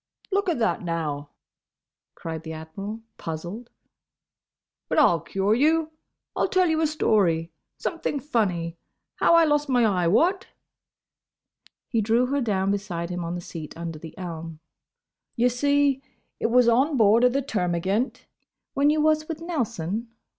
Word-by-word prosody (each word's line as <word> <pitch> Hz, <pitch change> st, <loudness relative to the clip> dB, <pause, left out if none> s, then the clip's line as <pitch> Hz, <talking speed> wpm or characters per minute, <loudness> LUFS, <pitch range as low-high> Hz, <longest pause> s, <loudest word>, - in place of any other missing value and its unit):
"Look 395 Hz, -1 st, +1 dB
a 340 Hz, -, +1 dB
that, 230 Hz, -1 st, 0 dB
now!" 155 Hz, -5 st, -3 dB, 0.9 s
cried 160 Hz, -1 st, -6 dB
the 160 Hz, 0 st, -7 dB
Admiral, 195 Hz, +8 st, -7 dB, 0.2 s
puzzled. 175 Hz, +9 st, -6 dB, 1.2 s
"But -, -, 0 dB
I'll 175 Hz, -, +5 dB
cure 195 Hz, +6 st, 0 dB
you! 310 Hz, +5 st, +2 dB, 0.4 s
I'll -, -, +1 dB
tell 370 Hz, -1 st, +3 dB
you 320 Hz, -1 st, +1 dB
a 315 Hz, -, +3 dB
story. 180 Hz, -, +1 dB, 0.3 s
Something 330 Hz, -4 st, -2 dB
funny. 180 Hz, -, -1 dB, 0.4 s
How 335 Hz, -, +5 dB
I 335 Hz, -1 st, +6 dB
lost 295 Hz, -1 st, +1 dB
my 245 Hz, -3 st, +4 dB
eye—what?" 215 Hz, -, +2 dB, 1.4 s
He 230 Hz, -3 st, 0 dB
drew 230 Hz, +4 st, +2 dB
her 280 Hz, +2 st, 0 dB
down 195 Hz, -4 st, 0 dB
beside 180 Hz, -4 st, -3 dB
him 180 Hz, 0 st, -3 dB
on 170 Hz, +1 st, -3 dB
the 175 Hz, -, -5 dB
seat 160 Hz, -3 st, -8 dB
under 165 Hz, -2 st, -5 dB
the 160 Hz, 0 st, -11 dB
elm. 165 Hz, -3 st, -7 dB, 0.8 s
"Ye 245 Hz, +1 st, +3 dB
see, 285 Hz, +2 st, +2 dB, 0.4 s
it -, -, +1 dB
was 245 Hz, +1 st, +4 dB
on 265 Hz, +5 st, +3 dB
board 220 Hz, +1 st, +5 dB
o' 250 Hz, -, +7 dB
the 275 Hz, +2 st, -1 dB
Termagant—" 190 Hz, +1 st, -1 dB, 0.5 s
"When 280 Hz, +1 st, +3 dB
you 305 Hz, 0 st, +2 dB
was 310 Hz, 0 st, +2 dB
with 325 Hz, -2 st, -5 dB
Nelson?" 235 Hz, -, -3 dB
220 Hz, 145 wpm, -25 LUFS, 170-285 Hz, 1.4 s, o